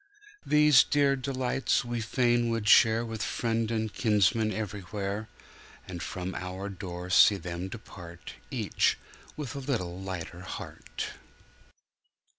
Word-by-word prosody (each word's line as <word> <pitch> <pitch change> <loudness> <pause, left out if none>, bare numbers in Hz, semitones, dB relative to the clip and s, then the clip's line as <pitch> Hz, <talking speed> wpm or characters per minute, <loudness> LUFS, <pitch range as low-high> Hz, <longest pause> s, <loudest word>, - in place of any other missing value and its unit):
These 150 -3 +6
dear 140 -2 +2
delights 130 -1 0
we 120 -1 -3
fain 120 +1 +2
would 115 -2 -1
share 115 +1 +6
With 110 -1 -5
friend 115 0 -1
and 110 -2 -2
kinsman 110 0 +2
everywhere, 105 0 -4 0.6
And 90 -2 -6
from 90 +4 -4
our 95 +2 -5
door 90 -2 -6
see 100 +3 +7
them 90 0 -5
depart 90 -5 -10 0.2
Each - - +1 0.4
with 145 -6 -5
a - - -3
little 100 -10 -3
lighter 90 -2 -6
heart. 95 - -6
110 Hz, 120 wpm, -29 LUFS, 95-120 Hz, 0.6 s, see